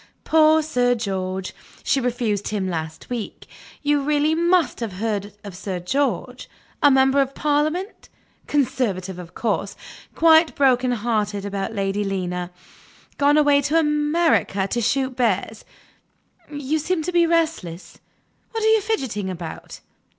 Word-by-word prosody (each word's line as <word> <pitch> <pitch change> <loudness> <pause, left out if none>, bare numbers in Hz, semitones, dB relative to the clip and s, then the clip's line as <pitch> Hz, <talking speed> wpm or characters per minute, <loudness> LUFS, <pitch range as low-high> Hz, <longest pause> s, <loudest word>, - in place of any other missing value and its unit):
Poor 315 0 +4
Sir 245 -5 +1
George 190 -4 -3 0.3
she 270 - +1
refused 235 -5 -1
him 200 -3 -2
last 160 -3 -5
week; 235 -4 -5 0.4
you 290 0 +2
really 295 +2 +1
must 340 -3 +2
have 225 -5 -4
heard 205 0 -3
of 200 -3 -9
Sir 185 -1 -4
George; 270 +11 -2 0.3
our 290 - +7
member 265 +1 +4
of 275 0 -2
parliament; 310 +7 -1 0.4
conservative 235 -10 -1
of 170 -2 -11
course; 205 -3 -2 0.4
quite 325 0 +5
broken 255 -2 +3
hearted 210 -3 -1
about 200 +2 -4
Lady 200 +1 -1
Lena; 180 -3 -3 0.7
gone 290 +1 +4
away 290 -1 +4
to 295 +3 +1
America 300 - +1
to 240 - -1
shoot 260 +3 0
bears. 220 -3 -1 0.9
You 290 +1 -2
seem 325 +1 -1
to 360 - -2
be 345 -1 +3
restless. 310 - -2 0.5
What 450 -1 -2
are 440 0 +5
you 440 - +3
fidgeting 260 - -2
about? 170 -3 -8
250 Hz, 135 wpm, -22 LUFS, 200-300 Hz, 0.9 s, our